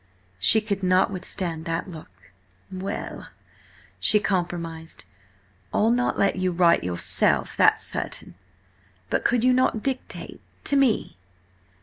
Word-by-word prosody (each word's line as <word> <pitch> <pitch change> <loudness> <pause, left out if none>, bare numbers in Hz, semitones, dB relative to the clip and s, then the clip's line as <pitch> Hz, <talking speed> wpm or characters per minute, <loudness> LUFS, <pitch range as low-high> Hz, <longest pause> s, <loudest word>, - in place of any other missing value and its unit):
She 220 - +5
could 200 -2 -3
not 185 +1 +3
withstand 180 -3 -3
that 165 +1 -2
look. 165 -4 -10 0.6
"Well," 190 +2 -5 0.7
she 210 - +5
compromised, 170 -4 -3 0.7
"I'll 220 +2 +2
not 245 +1 +1
let 200 -1 +2
you 185 0 0
write 170 -1 +3
yourself, 90 -1 +1
that's - - +4
certain–but 95 0 -7
could 240 -1 +2
you 255 0 +5
not 250 -4 +1
dictate 265 -2 -5 0.2
to 285 - +1
me?" 265 - +1
185 Hz, 115 wpm, -24 LUFS, 160-215 Hz, 0.7 s, She